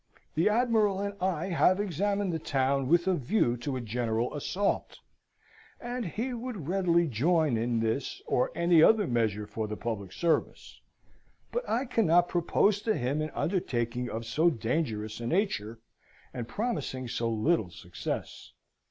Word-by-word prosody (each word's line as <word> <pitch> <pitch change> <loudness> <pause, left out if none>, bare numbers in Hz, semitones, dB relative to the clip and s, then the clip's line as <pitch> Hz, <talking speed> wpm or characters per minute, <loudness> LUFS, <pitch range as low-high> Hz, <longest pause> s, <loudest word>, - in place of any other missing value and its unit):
The 165 +6 +3
admiral 215 -4 +2
and 200 0 -2
I 185 -1 -1
have 185 +2 +3
examined 200 0 0
the 160 - -1
town 135 -2 0
with 170 +4 +3
a 190 - +3
view 145 - +1
to 130 +3 -3
a 130 - -3
general 115 +1 -1
assault: 190 +7 -1 0.8
and 245 0 -4
he 235 - -3
would 235 - -5
readily 175 -2 +2
join 150 +2 +2
in 115 0 0
this 115 +4 -2
or 125 - +1
any 170 -1 +4
other 215 +4 +6
measure 110 - 0
for 110 +1 -4
the 105 0 -5
public 105 -5 -4
service; 170 - -1 0.7
but 485 +1 -3
I 245 +4 +1
cannot 175 -8 +3
propose 195 +4 +2
to 220 -1 0
him 135 +5 -1
an 155 - -2
undertaking 125 - -1
of 115 +1 -5
so 155 +9 +3
dangerous 110 -5 -2
a 115 - -4
nature, 120 - -1 0.6
and 120 -2 -5
promising 145 - -3
so 115 -1 -1
little 110 - +1
success.... - - -6
155 Hz, 150 wpm, -29 LUFS, 120-195 Hz, 0.8 s, other